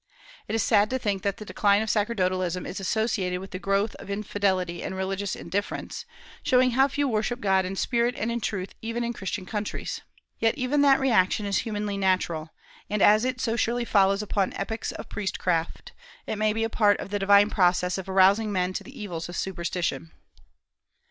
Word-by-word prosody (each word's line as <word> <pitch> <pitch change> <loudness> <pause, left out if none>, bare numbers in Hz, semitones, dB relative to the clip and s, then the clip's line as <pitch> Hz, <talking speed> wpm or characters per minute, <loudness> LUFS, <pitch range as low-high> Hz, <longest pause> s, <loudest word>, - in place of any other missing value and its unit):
It 215 - -2
is 225 - +1
sad 205 +1 +4
to 260 - 0
think 205 -6 -1
that 200 0 -1
the 215 - -8
decline 200 +2 +2
of 220 - -4
sacerdotalism 185 -4 0
is - - -5
associated 195 -3 -1
with 190 0 -9
the 185 - -5
growth 200 +2 0
of - - -11
infidelity 195 -4 -1
and 190 - -4
religious 190 +1 -2
indifference, 200 - -4 0.4
showing 255 0 +3
how 265 +3 +4
few 285 +1 -1
worship 235 +1 -1
God 190 -4 +2
in 190 +1 -4
spirit 235 +4 +1
and 225 +2 -1
in 235 0 -2
truth 195 -3 -3
even 230 +1 -3
in 235 0 -2
Christian 195 -2 -4
countries. 210 +1 -4 0.4
Yet 225 0 +2
even 270 +3 +1
that 275 -1 +5
reaction 215 -5 +2
is 200 -1 +1
humanly 210 -3 -3
natural; 180 -4 0 0.4
and 210 - -1
as 215 +2 +6
it 255 -1 -2
so 230 0 0
surely 235 +1 0
follows 200 -1 +3
upon 200 -2 0
epochs 220 +3 -3
of - - -8
priestcraft, 180 -4 -2 0.3
it - - -3
may 215 0 +3
be 225 +1 -1
a - - +1
part 210 -2 +3
of - - -7
the 205 - -1
divine 200 +1 +5
process 180 -1 +2
of 190 - -7
arousing 195 +3 +4
men 185 -1 0
to - - -4
the 265 - -12
evils 175 -5 -5
of 175 - -7
superstition. 175 -2 -2
205 Hz, 195 wpm, -26 LUFS, 190-225 Hz, 0.4 s, as